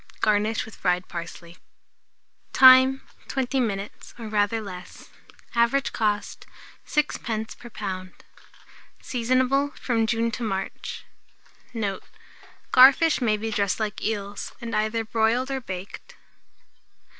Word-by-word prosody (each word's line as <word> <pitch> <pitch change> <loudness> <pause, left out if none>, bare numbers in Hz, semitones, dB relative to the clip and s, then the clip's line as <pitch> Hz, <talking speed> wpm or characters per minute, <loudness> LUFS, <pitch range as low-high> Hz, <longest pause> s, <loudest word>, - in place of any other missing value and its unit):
Garnish 215 +1 +1
with 220 - -13
fried 180 0 0
parsley. 170 0 -8 1.0
Time. 260 0 +7 0.2
20 265 0 -1
minutes, 200 -4 -4
or 230 -2 -7
rather 210 +1 +1
less. 180 -4 -10 0.4
Average 240 +4 +2
cost, 205 -2 -2 0.4
6d. 230 -7 -2
per 240 - -11
lb. 185 -4 -5 0.9
Seasonable 255 +3 +1
from 225 -3 0
June 230 0 0
to 245 - -6
March. 195 -4 -4 0.7
Note. 205 -5 -3 0.7
Garfish 275 +5 +6
may 215 -3 +2
be 220 +1 -4
dressed 200 -1 0
like 215 -1 -3
eels, 205 -2 -4
and 235 -2 -5
either 220 +1 0
broiled 230 +4 +1
or 265 -1 -2
baked. 190 -3 -8
225 Hz, 110 wpm, -25 LUFS, 205-250 Hz, 1.0 s, Time